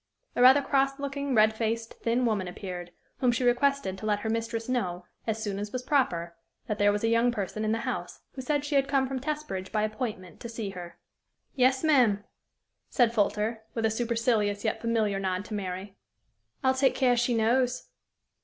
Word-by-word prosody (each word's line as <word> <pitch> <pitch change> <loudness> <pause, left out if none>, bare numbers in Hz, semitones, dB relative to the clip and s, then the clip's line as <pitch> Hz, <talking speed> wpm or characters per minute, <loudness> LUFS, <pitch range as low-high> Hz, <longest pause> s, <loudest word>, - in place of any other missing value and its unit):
"' - - -45
A - - +1
rather 265 +3 +7
cross 275 0 +1
looking, 280 -1 -2
red 215 0 +5
faced, 225 +1 -2
thin 240 +2 +1
woman 210 -5 0
appeared, 180 -1 -6 0.3
whom 250 -2 +3
she 240 +2 -1
requested 245 -5 +1
to 215 - -4
let 205 -1 +1
her 220 - -1
mistress 230 0 -2
know, 185 -9 -2 0.2
as 220 0 -1
soon 200 -2 -3
as 205 0 -5
was 255 0 -4
proper, 175 - 0 0.3
that 210 - -3
there 205 0 +5
was 205 +1 -2
a - - +3
young 230 +2 +3
person 215 -1 -3
in 215 - +1
the 225 +1 0
house - - -4
who 265 - -7
said 290 +2 -1
she 290 - -4
had 275 -1 +3
come 275 -1 +2
from 265 0 -3
Testbridge 295 -9 -4
by 215 -1 +1
appointment 215 -5 -4
to 235 - -7
see 225 -3 -4
her. 175 -2 -9 0.6
"Yes, 260 +1 +3
ma'am," 245 -10 +4 0.7
said 240 -3 +3
Folter, 215 +1 0 0.2
with 225 -1 0
a 220 - +2
supercilious 225 -3 0
yet 220 - -1
familiar 220 -4 +1
nod 190 0 -2
to 220 - -8
Mary; 195 0 -5 0.7
"I'll 260 0 +4
take 260 0 +2
care 250 -2 +3
she 240 0 +1
knows." 245 +3 +1
230 Hz, 200 wpm, -28 LUFS, 205-255 Hz, 0.7 s, rather